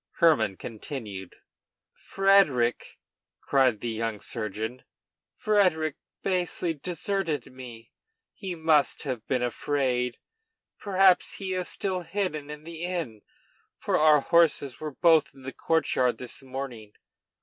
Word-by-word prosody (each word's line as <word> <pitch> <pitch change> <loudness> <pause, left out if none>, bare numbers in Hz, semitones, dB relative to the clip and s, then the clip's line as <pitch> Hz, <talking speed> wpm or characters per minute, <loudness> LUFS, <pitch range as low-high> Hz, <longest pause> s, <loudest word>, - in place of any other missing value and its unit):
Hermann 155 - +3
continued:] 105 - -7 0.6
"Frederic!" 195 -12 +2 0.4
cried 130 -6 +2
the 120 - -2
young 110 -1 -3
surgeon, 110 +3 -5 0.5
"Frederic 180 -8 +2 0.3
basely 180 -2 0
deserted 165 -3 -3
me. 120 -3 -11 0.4
He 190 -4 -6
must 160 -3 +2
have 125 -6 -4
been 125 -2 0
afraid. 125 -1 -1 0.6
Perhaps 190 -2 +3
he 190 -2 -4
is 185 -1 -2
still 190 -2 -2
hidden 175 -6 -3
in 150 0 -8
the 165 0 -7
inn, 165 - -3 0.6
for - - -1
our 150 -1 +5
horses 155 -5 +2
were 155 - -4
both 165 -3 +4
in 135 - -15
the 130 - -6
courtyard 130 -7 +1
this 125 +4 -7
morning. 130 -5 -7
145 Hz, 115 wpm, -27 LUFS, 125-175 Hz, 0.6 s, our